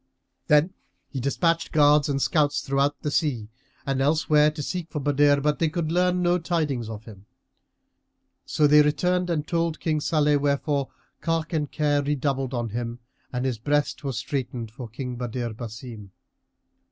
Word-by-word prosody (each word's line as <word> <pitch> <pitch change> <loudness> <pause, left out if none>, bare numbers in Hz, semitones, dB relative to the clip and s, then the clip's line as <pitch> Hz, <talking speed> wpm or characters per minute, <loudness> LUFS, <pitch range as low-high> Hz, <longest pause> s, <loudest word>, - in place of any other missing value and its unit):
Then 150 +5 +4 0.4
he 135 - -4
despatched 165 +6 0
guards 150 -1 +4
and 140 -1 0
scouts 145 0 +1
throughout 140 +1 0
the 150 - -1
sea 125 -10 0 0.4
and 135 -1 0
elsewhere 150 +1 +3
to 150 -1 -6
seek 175 0 -4
for 150 - -4
Badr; 145 0 +3
but 150 +1 0
they 165 - +2
could 160 -1 -2
learn 180 +1 +2
no 175 +1 +3
tidings 150 -9 -1
of 110 0 -8
him; 105 -2 -13 1.2
so 150 - +1
they 150 +1 +7
returned 180 +5 +1
and 155 -3 -1
told 165 -1 -1
King 155 -2 0
Salih, 150 -2 +2
wherefore 140 0 0 0.3
cark 165 0 -2
and 150 -3 -1
care 145 -2 +1
redoubled 140 -2 -1
on 120 -1 -2
him 120 +2 -4 0.3
and 125 +1 -2
his 125 -4 -1
breast 145 +4 0
was 135 -4 -3
straitened 125 -2 -4
for 125 +1 -8
King 125 +1 -6
Badr 120 0 -3
Basim. 110 -2 -8
145 Hz, 165 wpm, -25 LUFS, 130-155 Hz, 1.2 s, they